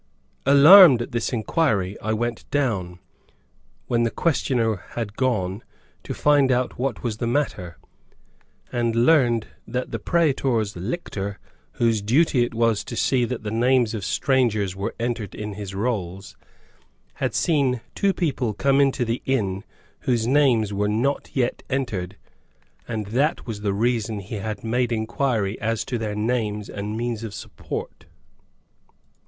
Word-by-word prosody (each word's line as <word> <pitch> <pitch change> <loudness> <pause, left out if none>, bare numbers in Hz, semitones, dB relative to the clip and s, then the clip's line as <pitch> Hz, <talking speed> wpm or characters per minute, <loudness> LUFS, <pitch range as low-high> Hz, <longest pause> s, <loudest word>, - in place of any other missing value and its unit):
Alarmed 145 +1 +9
at - - -10
this 120 -1 -1
inquiry, 110 - 0
I 110 - -2
went 120 +1 -3
down, 105 -11 -1 0.9
when 120 -1 +1
the 115 - +2
questioner 120 - 0 0.2
had 110 -3 -4
gone, 105 -6 -1 0.4
to - - -6
find 145 -3 +3
out 125 -1 -1
what 130 -1 -2
was 115 -3 -2
the 115 - -2
matter, 115 - -2 0.9
and 120 -2 0
learned 120 -8 +3 0.2
that 125 +2 -3
the 115 - -3
praetor's 130 -8 +1
lictor, 100 - -4 0.4
whose 115 -3 +1
duty 125 +4 +3
it 120 - -4
was 115 -2 +2
to - - -6
see 125 -3 +2
that 120 -1 -5
the 105 - -4
names 120 0 +2
of 105 -4 -4
strangers 110 -3 +1
were 100 +1 -4
entered 115 -4 -3
in 105 -1 -5
his 100 -1 -7
rolls, 95 -4 -3 0.9
had - - -1
seen 135 -7 +1
two 200 - +2
people 135 - -1
come 140 +4 +3
into 135 -2 +2
the 115 +2 -2
inn, 100 -7 0 0.5
whose 120 -3 +2
names 120 -6 +3
were 105 +1 0
not 120 +7 0
yet 125 -2 0
entered, 105 -8 -3 0.7
and 110 -3 -3
that 140 +8 0
was 110 -4 -6
the 105 -1 0
reason 110 0 0
he 100 +3 -6
had 105 0 -5
made 120 +2 0
inquiry 110 -2 -1
as 115 0 -1
to 120 - -3
their 105 -2 -3
names 105 -2 -1
and 105 +2 -5
means 115 -1 -3
of 105 -3 -6
support. - - -7
115 Hz, 150 wpm, -23 LUFS, 105-130 Hz, 0.9 s, Alarmed